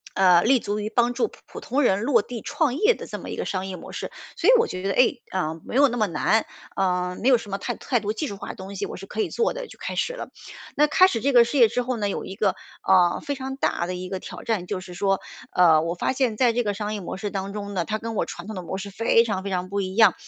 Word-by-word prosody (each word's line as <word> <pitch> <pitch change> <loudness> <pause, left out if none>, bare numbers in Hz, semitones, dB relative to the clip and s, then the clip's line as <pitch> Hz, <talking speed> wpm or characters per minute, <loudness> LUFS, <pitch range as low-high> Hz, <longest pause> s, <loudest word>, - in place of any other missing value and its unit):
呃， 180 -3 +6
立 255 +2 +4
足 205 0 -3
于 210 +1 -3
帮 240 +1 +2
助 445 - +1
普 - - -17
普 - - -9
通 270 +5 0
人 200 -4 +3
落 235 -3 +3
地 240 -3 -7
创 290 -6 0
业 430 - +4
的 - - -8
这 - - -6
么 - - -8
一 - - -4
个 - - -3
商 190 0 -2
业 190 - -5
模 175 - -10
式， - - -5 0.3
所 - - +3
以 - - +9
我 460 - +3
觉 185 - -5
得， 195 - -1
哎， 250 - +4 0.2
嗯， 160 -3 -2
没 - - -6
有 280 +1 +6
那 245 - -3
么 215 -3 +2
难。 190 +7 +1 0.3
嗯， 180 -1 0
没 250 - 0
有 250 - +6
什 210 - -10
么 195 - -1
太 - - -3
太 245 -4 0
多 210 0 -2
技 300 +5 -3
术 200 - -6
化 - - -8
的 - - -6
东 195 +1 -8
西， 200 +1 -2
我 - - -7
是 195 - -9
可 220 - -7
以 - - -1
做 470 - +1
的， - - -5
就 - - -14
开 - - -4
始 - - 0
了。 - - -7 0.5
那 300 +1 +5
开 370 +5 +6
始 230 - -2
这 280 +2 +1
个 240 -1 +8
事 255 +4 -2
业 230 - +8
之 250 - -1
后 250 0 -2
呢， 205 -2 -1
有 - - -3
一 190 - -7
个， 200 -2 +1 0.3
呃， 180 -2 +5
非 285 - -1
常 265 0 -5
大 170 -9 0
的 180 - -3
一 185 0 -6
个 190 - -3
挑 - - -9
战， 205 -6 -1
就 185 - -2
是 180 -1 -10
说， 195 0 +1 0.3
呃， 165 -3 +6
我 170 +1 -2
发 220 - 0
现 250 -5 0
在 245 -3 +4
这 245 - +1
个 205 -1 -1
商 210 +1 -3
业 205 - -5
模 180 - -5
式 205 +1 -3
当 195 0 -3
中 205 -1 -5
呢， 180 - 0
它 215 - -1
跟 230 0 -5
我 - - 0
传 175 - -8
统 215 - -6
的 185 - -4
模 190 - -4
式 200 - -6
非 230 +2 +3
常， 205 -5 -2
非 200 - -4
常 180 0 -2
不 200 +1 -1
一 190 0 -4
样。 220 -5 +6
210 Hz, 335 characters per minute, -24 LUFS, 190-245 Hz, 0.5 s, 以